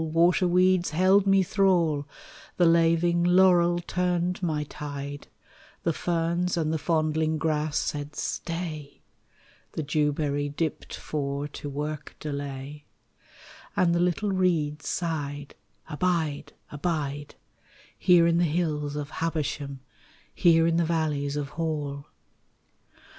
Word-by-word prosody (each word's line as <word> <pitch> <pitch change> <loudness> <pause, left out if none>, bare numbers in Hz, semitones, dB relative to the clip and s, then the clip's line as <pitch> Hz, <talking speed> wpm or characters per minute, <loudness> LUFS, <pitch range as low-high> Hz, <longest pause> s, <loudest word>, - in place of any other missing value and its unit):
waterweeds 180 +2 +3
held 190 +5 +3
me 195 -1 +5
thrall, 180 -7 +2 0.5
The 175 - +4
laving 170 +1 +3
laurel 175 -1 +5
turned 180 0 -1
my 155 -4 -1
tide, 145 -1 -7 0.6
The 170 - +1
ferns 170 +2 -1
and 160 -1 0
the 160 - -1
fondling 155 0 0
grass 155 -1 0
said 145 0 -3
Stay, 160 -3 -5 0.7
The 160 - -3
dewberry 145 -1 0
dipped 155 +2 -3
for 140 -1 -3
to 145 - -7
work 150 +1 -5
delay, 140 0 -6 0.9
And 170 -2 +3
the 170 - +1
little 180 +4 +1
reeds 165 -6 0
sighed 145 -4 -3 0.3
Abide, 160 -2 -1 0.2
abide, 145 -2 -3 0.6
Here 175 -2 +5
in 170 0 +3
the - - +3
hills 150 -3 -1
of 150 0 -5
Habersham, 145 -4 -3 0.5
Here 165 -2 +4
in 165 0 +2
the 170 - +3
valleys 155 -4 -1
of 145 -1 -3
Hall. 150 -3 -3
160 Hz, 115 wpm, -26 LUFS, 145-175 Hz, 0.9 s, me